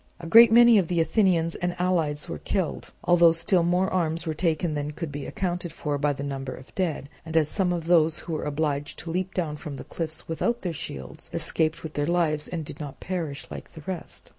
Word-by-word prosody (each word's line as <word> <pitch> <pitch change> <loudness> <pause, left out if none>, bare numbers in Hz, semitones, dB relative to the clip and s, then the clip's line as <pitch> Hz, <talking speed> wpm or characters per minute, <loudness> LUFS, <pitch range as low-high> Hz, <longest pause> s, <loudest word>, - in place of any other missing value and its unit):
A 170 - -8
great 230 +6 +8
many 235 -1 +8
of 180 - 0
the 175 0 0
Athenians 170 -2 +2
and 175 0 -2
allies 165 -5 0
were - - -5
killed, 190 -6 -2
although 170 -1 +6
still 170 +2 +2
more 180 +2 +2
arms 165 -2 +1
were 160 - -1
taken 160 0 0
than 145 0 -2
could 165 -1 -5
be 145 0 -5
accounted 175 -2 -3
for 150 -2 -3
by 145 0 +2
the 140 0 -5
number 135 -2 -4
of 130 - -12
the - - -23
dead, 165 -7 -2 0.2
as 160 -2 +1
some 190 -3 +1
of 170 -2 -2
those 165 -1 +4
who 170 - -4
were 155 - -2
obliged 145 -1 -2
to 165 - -6
leap 185 +2 -2
down 155 -5 -1
from 150 -2 -7
the - - -7
cliffs 160 -2 -5
without 235 +8 -1
their 175 -3 -2
shields 65 - -8
escaped 160 +1 0
with 160 -1 -6
their 145 0 -1
lives 165 -4 +1
and 165 -3 -4
did 145 - -8
not 145 -3 -7
perish 165 -5 -4
like - - -9
the 160 - -10
rest. 185 -2 -6
165 Hz, 225 wpm, -26 LUFS, 150-180 Hz, 0.2 s, great